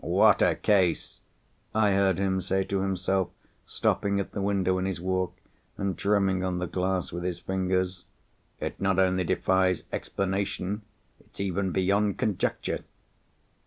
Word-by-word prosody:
"What - - +4
a - - +4
case!" 95 -5 +1 0.6
I 105 -2 +4
heard 95 -2 +3
him 95 -1 +1
say 95 +1 0
to 95 0 -1
himself, 95 -1 0 0.4
stopping 100 0 0
at 100 - -3
the 100 - -3
window 95 -2 +1
in 95 - -1
his 95 -3 -3
walk, 95 0 -1 0.4
and 100 -2 -1
drumming 95 -1 +1
on 90 -1 -1
the 90 - -1
glass 90 +1 -1
with 85 - -4
his 90 -1 -2
fingers. 95 +1 -1 0.5
"It - - -5
not 95 -2 +2
only 95 -1 +3
defies 95 +1 +2
explanation, 100 +1 -2 0.4
it's - - -19
even 95 -1 -1
beyond 100 +2 +2
conjecture." 105 -4 -1
95 Hz, 145 wpm, -27 LUFS, 90-100 Hz, 0.6 s, What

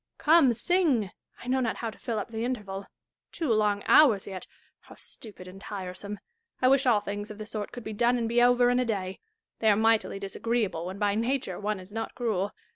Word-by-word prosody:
Come, 305 -4 +5
sing. 265 - +1 0.3
I - - -10
know 260 +1 +2
not 235 -3 0
how 230 -2 -4
to - - -17
fill 230 -2 -3
up 210 - -4
the 225 0 -3
interval. 205 -6 -4 0.4
Two 305 -9 0
long 210 -2 +1
hours 230 -11 +6
yet! 190 -2 -7 0.2
— - - -38
how - - -14
stupid 205 -5 -9
and 190 +1 -11
tiresome! 200 0 -6 0.4
I 255 - +4
wish 270 0 +3
all 220 -4 +4
things 205 0 -5
of 215 - -8
the 215 - -6
sort 215 -1 -5
could 245 - -8
be 220 - -5
done 240 +3 +2
and 230 -1 -1
be 235 +1 +2
over 245 0 +5
in 245 - +2
a 250 - +1
day. 190 -4 -3 0.4
They 220 - +3
are 205 - +4
mightily 225 -2 +2
disagreeable 195 -3 -2
when 190 +2 -6
by 205 -1 +1
nature 230 -3 -1
one 210 -1 -2
is 185 +2 -13
not 225 +1 -5
cruel. 210 -5 -1
220 Hz, 220 wpm, -28 LUFS, 200-245 Hz, 0.4 s, hours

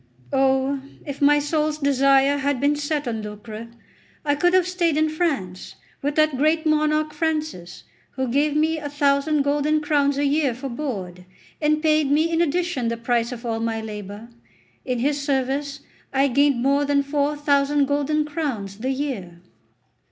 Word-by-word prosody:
Oh, 265 +1 +2 0.2
if 285 -1 -7
my 295 +1 +5
soul's 300 +1 0
desire 275 0 +3
had 280 -1 0
been 285 +2 +2
set 295 -1 -2
on 225 -2 -2
lucre, 215 +2 -8 0.6
I 290 - +2
could 350 +5 +2
have 365 -1 +3
stayed 345 -4 0
in 310 0 +2
France, 285 - -3 0.3
with 290 +1 -2
that 310 -3 +2
great 315 +2 +2
monarch 305 0 +1
Francis, 305 - -3 0.3
who 260 -1 -2
gave 290 +4 +1
me 315 +1 +1
a 290 -1 -5
thousand 285 +1 +1
golden 295 +2 +1
crowns 285 -2 +1
a 285 - +1
year 280 -3 +1
for 270 +2 -6
board, 195 -10 -5 0.4
and 305 +1 +1
paid 310 -2 +3
me 315 +3 +2
in 330 0 +2
addition 340 -5 0
the 230 0 -2
price 235 0 0
of 245 0 -7
all 225 -1 -2
my 225 0 -2
labour. 210 0 -8 0.5
In 250 -2 -2
his 285 +4 0
service 280 +1 -1 0.3
I 275 +1 +2
gained 275 -1 +2
more 280 +2 +3
than 285 0 +2
four 290 +1 -1
thousand 285 0 +2
golden 290 +2 0
crowns 255 - -4
the 255 +4 -2
year." 255 -11 -4
285 Hz, 165 wpm, -23 LUFS, 255-300 Hz, 0.6 s, my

